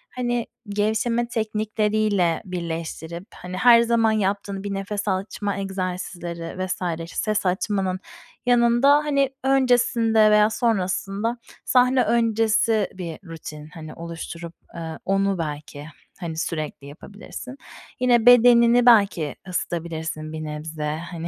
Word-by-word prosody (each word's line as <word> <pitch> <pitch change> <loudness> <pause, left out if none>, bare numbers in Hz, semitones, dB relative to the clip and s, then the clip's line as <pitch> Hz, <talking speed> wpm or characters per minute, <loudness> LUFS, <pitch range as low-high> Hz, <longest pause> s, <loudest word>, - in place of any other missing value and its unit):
hani, 240 -2 -1 0.2
gevşeme 220 +3 0
teknikleriyle 215 -5 0
birleştirip, 170 -1 -5
hani, 180 +1 -7
her 235 +1 +7
zaman 230 -1 +2
yaptığın 200 -1 -1
bir 200 -1 -3
nefes 200 +1 -4
açma 200 +1 -2
egzersizleri 185 -2 -4
vs. 170 -3 -3
ses 215 -2 -1
açmanın 185 0 0 0.5
yanında, 240 +3 +4
hani, 280 -3 +1
öncesinde 240 -5 +3
veya 210 0 +5
sonrasında 215 0 -1 0.3
sahne 255 0 +4
öncesi 225 -2 +2
bir 175 -4 -7
rutin, 155 -2 -9
hani, 155 -2 -9
oluşturup, 170 0 -7 0.2
eee, 160 -1 -6
onu 195 0 +1
belki, 150 -2 -6 0.3
hani, 165 -3 -5
sürekli 155 -4 -4
yapabilirsin. 205 - -10 0.4
Yine 240 -2 +3
bedenini 245 0 +6
belki 200 - +4
ısıtabilirsin 160 -3 -4
bir 155 - -5
nebze, 150 0 -4
hani, 170 -1 -5
200 Hz, 110 wpm, -23 LUFS, 170-230 Hz, 0.5 s, her